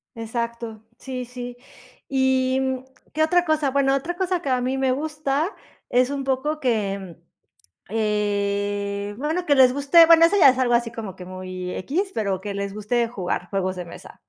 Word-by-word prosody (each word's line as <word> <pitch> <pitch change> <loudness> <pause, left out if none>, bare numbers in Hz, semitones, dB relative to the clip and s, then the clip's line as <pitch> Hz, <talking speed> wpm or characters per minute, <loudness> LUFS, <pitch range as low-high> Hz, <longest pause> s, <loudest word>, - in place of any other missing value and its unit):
Exacto, 230 -1 -4 0.2
sí 255 -1 -6
sí 245 0 -8 0.5
¿y, 265 -1 +2
mm, 260 -1 -1 0.3
qué 315 - +2
otra 355 +2 +3
cosa? 310 -3 +1
Bueno, 270 0 +2
otra 330 +6 -3
cosa 365 -1 -1
que 280 - -3
a 255 -1 +1
mí 260 +2 -1
me 265 -1 +1
gusta 305 +4 -1 0.4
es 250 +1 +3
un 280 -1 -3
poco 275 +3 -1
que, 200 - -2 0.7
eh 205 -1 -1
bueno, 320 +6 -2
que 290 - +4
les 260 -2 +6
guste, 285 +5 +6
bueno, 330 0 +7
eso 355 +5 +4
ya 315 - +8
es 255 - -3
algo 245 -2 +2
así 235 -1 +1
como 220 -5 -7
que 180 - -9
muy 185 0 -6
equis, 360 - -2
pero 200 -4 -1
que 200 +1 -5
les 200 0 -4
guste 230 +3 0
jugar 185 -5 -3
juegos 185 -1 -1
de 180 - -5
mesa. 170 - -12
250 Hz, 180 wpm, -23 LUFS, 205-280 Hz, 0.7 s, ya